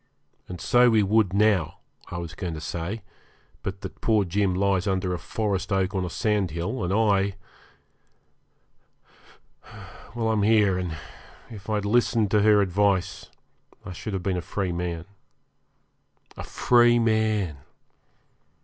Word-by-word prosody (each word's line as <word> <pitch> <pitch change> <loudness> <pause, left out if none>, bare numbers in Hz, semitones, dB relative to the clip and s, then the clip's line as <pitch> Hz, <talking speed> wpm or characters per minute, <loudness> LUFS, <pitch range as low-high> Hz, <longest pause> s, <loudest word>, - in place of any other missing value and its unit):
And 90 -1 -8
so 120 +7 +4
we 110 -2 +3
would 105 -1 +2
now 100 -5 +2 0.3
I 85 - -5
was 85 -1 -6
going 85 -2 -5
to - - -6
say 85 +7 -5 0.6
but 95 0 -5
that - - -9
poor 110 -3 +2
Jim 95 +1 0
lies 95 0 +1
under 95 -1 0
a 90 - -4
forest 100 -2 -3
oak 95 0 0
on 95 -2 -1
a 90 - -3
sandhill, 95 0 -1
and 90 - -2
I 100 -2 +2 2.8
well, 115 -1 -1
I'm 110 -2 +1
here, 105 -2 +3
and 85 -3 -4 0.5
if 105 -2 -10
I'd 105 -1 -1
listened 110 -1 +2
to 105 - +4
her 105 -1 +5
advice 95 -1 0 0.6
I 90 - -7
should 100 +4 -6
have 95 -2 -3
been 95 -1 -1
a - - -2
free 95 +1 -3
man. 85 -1 -4 1.3
A - - -7
free 120 -1 +3
man! 110 -8 +1
100 Hz, 140 wpm, -25 LUFS, 90-110 Hz, 2.8 s, her